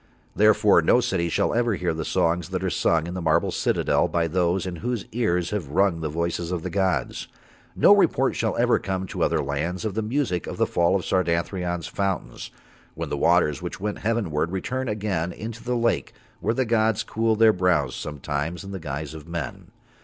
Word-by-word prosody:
Therefore 105 -2 +5
no 100 +9 +4
city 95 -8 0
shall - - +1
ever 120 -2 +1
hear 90 -3 -1
the 80 0 -3
songs 85 +1 0
that - - -3
are - - 0
sung 80 -1 +1
in 85 - -5
the 90 - -4
marble 85 0 +2
citadel - - +1
by 85 -1 0
those 90 +2 0
in 90 -2 -5
whose 120 +5 -3
ears 90 -7 0
have 105 -8 -2
rung 90 +2 +2
the 80 - -2
voices 85 +2 -2
of 90 -3 -2
the - - -4
gods. 95 -4 -1 0.5
No - - +7
report - - +2
shall - - -1
ever - - +3
come 95 0 -3
to - - -6
other - - +2
lands 80 +8 -3
of 105 - -2
the 110 - -1
music 110 - -1
of - - -5
the - - +3
fall 85 +2 +2
of 95 - -1
Sardathrion's 90 0 -1
fountains, 100 -3 -3 0.5
when - - -4
the - - -1
waters 85 -5 +2
which - - -6
went 105 +1 -3
heavenward 95 -8 -1
return 130 +7 -3
again 100 -5 -2
into 110 +4 -7
the 125 0 -1
lake 115 0 0 0.3
where 115 - 0
the 130 - +1
gods 110 -2 +2
cool 110 0 0
Their 110 0 +5
brows 90 -8 +1
sometimes 75 +4 -4
in 100 - -8
the 95 - -5
guise 75 -1 -5
of 80 0 -10
men. 85 -7 -5
90 Hz, 200 wpm, -24 LUFS, 85-105 Hz, 0.5 s, No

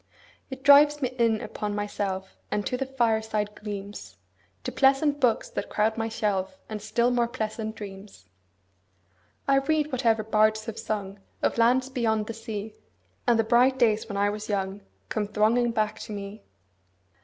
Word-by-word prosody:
It 265 -1 -8
drives 290 +1 +7
me 255 -4 0
in 225 -2 +3
upon 210 -1 -4
myself 195 -2 -3
5 - - -30
And 205 -1 -1
to - - -1
the 265 +1 -2
fireside 220 -4 0
gleams, 205 -1 -7 0.5
To - - -3
pleasant 280 +2 +3
books 245 -5 +2
that - - -4
crowd 220 +1 +1
my 225 0 -2
shelf, 210 +1 -1
And 215 -1 -5
still 235 +4 +1
more 240 -1 +2
pleasant 220 -2 -4
dreams. 195 - -10 1.2
I 275 0 +5
read 300 +2 +1
whatever 230 -4 +2
bards 215 0 +2
have 225 -1 -6
sung 205 -3 -4 0.2
Of - - +1
lands 255 +3 +3
beyond 225 -5 0
the 230 - -5
sea, 220 -2 -5
10 - - -30 0.5
And 235 -2 +4
the - - +4
bright 245 +4 +4
days 220 -2 +2
when 200 - -3
I 205 0 +2
was 210 +1 -6
young 195 0 -2 0.3
Come 210 -2 -1
thronging 220 +4 +2
back 215 -2 -1
to - - -8
me. 200 +1 -7
220 Hz, 170 wpm, -26 LUFS, 210-245 Hz, 1.2 s, drives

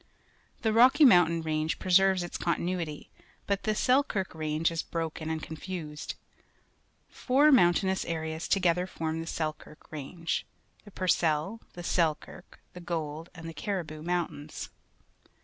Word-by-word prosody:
The 220 -1 +2
Rocky 260 +6 +7
Moimtain 170 -8 +5
Range 155 0 -1
preserves 190 0 +4
its 175 - -7
continuity, 170 -3 -2 0.3
but 200 -1 0
the 215 -1 +1
Selkirk 250 -7 +1
Range 155 +1 0
is 165 -1 -1
broken 160 -1 -4
and 160 -1 -3
confused. 160 -1 -6 1.0
Four 280 +4 +3
mountainous 190 - +4
areas 160 -1 -3
together 180 -2 +2
form 160 -2 -3
the 165 - -7
Selkirk 155 -2 -5
Range 160 +3 -3 0.2
— - - -30
Ihe 205 - -13
Fur 185 - -2
cell, 165 +6 +1
the 175 - -8
Selkirk, 170 +1 -2
the 180 - -9
Gold, 165 -1 -4
and^ 165 -1 -10
the 165 - -6
Caxihoo 195 -1 -3
Jdmrnt 165 +3 -2
ains. 145 - -8
170 Hz, 140 wpm, -29 LUFS, 160-190 Hz, 1.0 s, Rocky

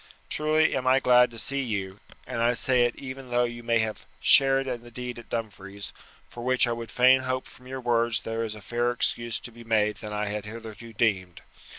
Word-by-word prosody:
Truly 155 +1 +2
am 130 -1 -2
I 130 +1 +5
glad 125 -1 +5
to 115 - -11
see 140 +5 0
you, 100 -5 -4 0.3
and 115 - -3
I 120 +1 +3
say 125 +1 +3
it 120 - -1
even 130 -1 -8
though 120 0 +2
you 120 0 -4
may 115 0 +1
have 110 -1 -4
shared 135 0 +5
in 125 -3 -4
the 120 - -13
deed 125 0 -6
at 120 - -14
Dumfries, 100 -3 -6 0.3
for 120 - -10
which 130 +1 +3
I 120 - -2
would 115 -1 -5
fain 130 +1 +5
hope 130 0 -2
from 125 - -16
your 130 0 -6
words 120 -2 +1
there 115 0 -3
is 110 -1 -4
fairer 120 +3 -1
excuse 120 -1 -1
to 120 - -9
be 115 0 -13
made 105 -2 +1
than 105 - -8
I 105 0 -2
had 105 0 -4
hitherto 115 +1 -9
deemed. 95 -6 0
120 Hz, 220 wpm, -26 LUFS, 110-125 Hz, 0.3 s, I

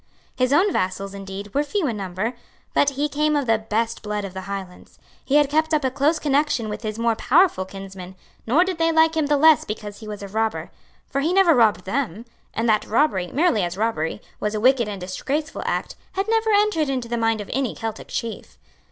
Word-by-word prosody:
His 255 0 +1
own 365 +7 +4
vassals, 195 +1 -2
indeed, 195 +1 -8
were 285 - +2
few 355 +4 -1
in 240 -6 -1
number; 195 +4 -3 0.4
but 285 - +4
he 285 +2 -1
came 300 +1 +1
of 285 -2 +1
the 225 -2 +2
best 225 +1 -2
blood 210 -1 -3
of 190 - -8
the 190 - -5
Highlands; 190 -2 -7 0.3
he 280 - 0
had 295 -1 +5
kept 315 +2 +1
up 300 - 0
a 260 - +1
close 285 +5 +2
connection 285 -6 +1
with 210 - -5
his 215 -1 -4
more 230 0 +1
powerful 275 - +3
kinsmen; 190 -1 -9 0.3
nor 290 +10 +5
did 370 -3 -3
they 330 0 +3
like 320 0 +4
him 310 -2 +1
the 295 0 +3
less 315 +1 +6
because 210 -1 -6
he 220 - -10
was 210 -1 -6
a - - -5
robber; 220 +2 -2 0.4
for 275 - -1
he 315 +5 +1
never 370 -3 +5
robbed 220 -8 +3
them; 225 -1 -2 0.3
and 225 +1 0
that 215 -1 +2
robbery, 210 -7 +2
merely 310 - +2
as 175 +1 -3
robbery, 210 -4 -1 0.2
was 210 +1 -2
a - - -1
wicked 245 0 +3
and 205 -2 -5
disgraceful 280 - -3
act, - - -2 0.2
had 390 +2 -1
never 450 0 +2
entered 410 -8 +2
into 255 -3 -2
the 235 - -2
mind 225 -1 +1
of 205 - -6
any 265 -2 -1
Celtic 225 -1 -5
chief. 230 -1 -5
235 Hz, 220 wpm, -23 LUFS, 210-300 Hz, 0.4 s, less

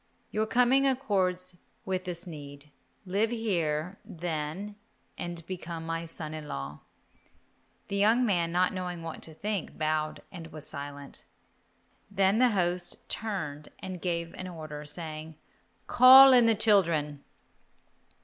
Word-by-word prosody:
Your 215 +1 0
coming 250 +4 +4
accords 185 -9 0 0.3
with 185 -1 -2
this 175 0 -5
need. 145 -3 -10 0.3
Live 200 +4 +1
here, 180 -6 -1
then, 170 +4 -4 0.4
and 175 -2 -5
become 170 -2 -6
my 165 0 -3
son 160 -1 -5
in 155 -1 -7
law." 70 - -6 1.1
The 200 - -2
young 225 +5 +4
man, 175 -6 +1
not 180 +1 +2
knowing 180 -2 -4
what 165 -1 -7
to 160 - -8
think, 205 -1 -3
bowed 155 0 -1
and 170 -3 -8
was 155 -2 -10
silent. 140 0 -8 0.8
Then 195 +1 +2
the 250 0 +5
host 175 -4 -2
turned 155 -9 -4
and 185 -2 -7
gave 170 -2 -2
an 185 - -7
order, 155 -4 -7
saying, 155 0 -7 0.5
"Call 260 +2 +9
in 245 -2 +6
the 225 - +4
children." 165 -10 +2
175 Hz, 130 wpm, -29 LUFS, 155-200 Hz, 1.1 s, Call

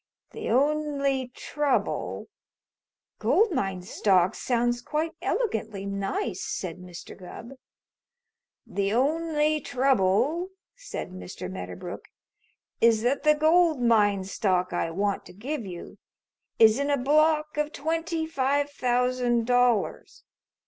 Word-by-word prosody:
The - - -5
only 280 0 +1
trouble 290 +3 -2 0.5
" - - -64
"Gold 430 +1 +3
mine 195 - -2
stock 185 -1 +2
sounds 240 -1 0
quite 305 +5 -2
elegantly 220 - -2
nice," 200 - -3
said 180 -2 -4
Mr. 180 -1 -10
Gubb. 215 +6 -10 1.1
"The 200 0 -1
only 305 +3 +1
trouble," 255 - +2 0.3
said - - -7
Mr. 185 - -7
Medderbrook, 90 -1 -7 0.8
"is 225 -1 +4
that 255 +4 +1
the 300 0 +4
gold 315 0 +4
mine 210 -5 +3
stock 185 -2 0
I 170 -1 -1
want 200 +4 -1
to - - -13
give 235 +3 -5
you 175 -2 -9 0.6
is 225 +2 +6
in 280 +1 0
a 285 - +2
block 305 +3 +2
of 300 0 0
twenty 325 +2 -2
five 285 -1 0
thousand 250 -2 +1
dollars. 245 -2 +1
250 Hz, 115 wpm, -26 LUFS, 200-300 Hz, 1.1 s, is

